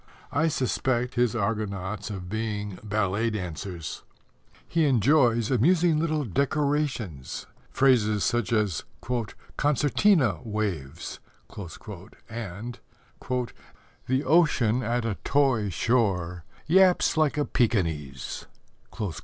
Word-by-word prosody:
I 150 +4 +2
suspect 130 -3 0
his 120 -2 +1
Argonauts 105 -2 -2
of 95 -4 -6
being 105 -1 -3
ballet 105 +1 0
dancers. 90 -5 -5 0.7
He 165 -2 +2
enjoys 120 -2 +3
amusing 160 - +3
little 155 -2 0
decorations 140 - -1 0.2
phrases 110 -6 +3
such 120 -4 0
as 105 -7 +1 0.7
"concertina 145 - +3
waves" 95 - -4 1.1
and 115 +1 -6 1.3
The 130 +2 +1
ocean 130 -7 +3
at 120 0 -1
a 110 -4 -2
toy 130 -7 +2
shore 90 -3 0 0.2
Yaps 185 +2 +4
like 155 -2 +2
a 145 - +1
Pekinese. 80 - -1
115 Hz, 90 wpm, -27 LUFS, 100-140 Hz, 1.3 s, Yaps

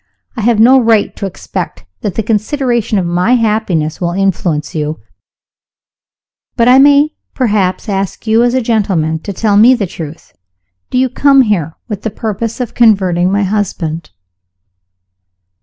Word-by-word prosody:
I - - -4
have 225 0 +2
no 255 +4 +6
right 225 -3 +1
to 200 - -4
expect 90 - -6 0.2
that 200 -4 -3
the 225 - -1
consideration 230 +1 -1
of 185 - 0
my 180 +8 +1
happiness 210 -10 -1
will 175 -1 -1
influence 175 -5 -1
you 155 0 -3 1.6
but 235 - +2
I 255 +2 +6
may 285 +2 +4 0.2
perhaps 205 -7 0
ask 195 0 -3
you, 220 +1 +3
as 245 +1 +2
a 260 - +1
gentleman, 190 -9 0
to 200 - -6
tell 205 +1 +1
me 240 +5 +6
the 215 -5 -2
truth. 165 -3 -9 0.6
Do - - -2
you 260 +1 +3
come 275 +2 +3
here 175 -8 -1
with 210 -4 -5
the 225 - -3
purpose 220 +2 -4
of 245 -3 -4
converting 190 -6 +2
my 200 +1 +1
husband?" 175 -6 -3
210 Hz, 155 wpm, -13 LUFS, 180-235 Hz, 1.6 s, no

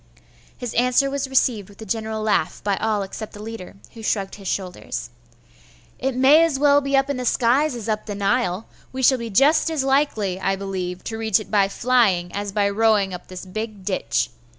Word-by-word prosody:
His 245 -3 -5
answer 250 +3 +2
was 280 -1 -2
received 235 -6 +1
with 200 - -17
a 220 - -8
general 220 +1 -3
laugh 215 - 0
by 200 -1 +1
all 215 -2 0
except 210 +3 -7
the 205 - -10
leader, 220 -5 -8 0.2
who 230 - -10
shrugged 200 -3 -1
his 195 -2 -9
shoulders. 180 -10 -4 0.9
'It 265 -1 -1
may 275 +5 +6
as 325 -5 +1
well 285 0 +4
be 275 0 +1
up 270 0 +2
in 280 -2 -2
the 250 - -3
skies 250 +4 +2
as 230 -3 -6
up 215 0 -2
the 205 - -4
Nile. 200 -1 0 0.2
We 260 0 -4
shall 260 0 +5
be 230 -1 -5
just 290 - +4
as 315 -4 -1
likely, 265 -9 +1
I 195 0 +1
believe, 185 -2 -5
to 220 -1 -5
reach 220 -2 +2
it 200 -2 -10
by 200 -2 +4
flying, 200 -6 +2
as 205 0 -3
by 200 0 +1
rowing 205 -2 +2
up 180 - -8
this 185 0 -8
big 210 +1 -6
ditch. 150 - -1
220 Hz, 205 wpm, -22 LUFS, 195-255 Hz, 0.9 s, may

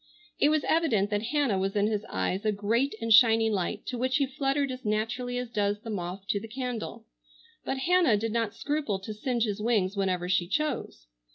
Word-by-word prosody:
It 290 - +5
was 310 -1 +2
evident 230 -12 +2
that 205 0 +1
Hannah 255 -6 +1
was 195 +1 -1
in 205 0 +3
his 210 -1 -1
eyes 95 - -1
a 215 - +2
great 220 +6 0
and 230 -1 +2
shining 225 0 +6
light, 200 +2 -2
to 245 - -4
which 260 +2 +1
he 280 - +2
fluttered 275 +1 -1
as 255 0 -7
naturally 240 +4 -1
as 250 -1 -4
does 205 -2 0
the 225 -1 -6
moth 185 0 -5
to 200 - +1
the 225 - -8
candle. 245 -1 -5 0.6
But 270 - -2
Hannah 335 -5 +3
did 225 +2 -2
not 225 -2 -1
scruple 290 -9 -1
to 195 +3 -7
singe 235 +2 -1
his 210 -2 -2
wings 210 -4 +1
whenever 185 -3 0
she 180 -1 +1
chose. 290 - -2
225 Hz, 205 wpm, -28 LUFS, 205-255 Hz, 0.6 s, shining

